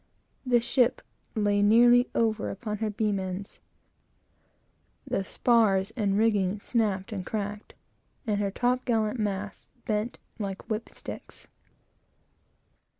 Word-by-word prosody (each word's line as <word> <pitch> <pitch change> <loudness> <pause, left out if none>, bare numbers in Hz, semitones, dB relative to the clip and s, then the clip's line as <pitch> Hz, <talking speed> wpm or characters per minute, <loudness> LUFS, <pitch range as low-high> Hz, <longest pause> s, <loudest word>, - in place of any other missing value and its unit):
The 245 -1 +5
ship 245 +1 +2 0.3
lay 205 -2 +2
nearly 240 +4 +6
over 220 -3 0
on 210 -2 -2
her 220 - 0
beam 210 -1 0
ends; 190 +1 -5 1.5
the 195 - -1
spars 210 -3 +2
and 200 -4 +1
rigging 210 -3 +2
snapped 210 -2 -1
and 195 -4 -3
cracked; 205 +1 -5 0.5
and 210 -3 0
her 200 -1 0
top 250 +5 0
gallant 225 -1 0
masts 205 -1 -4
bent 215 +2 -1 0.2
like 195 -2 -5
whip 215 +1 -2
sticks. - - -7
210 Hz, 115 wpm, -28 LUFS, 200-230 Hz, 1.5 s, nearly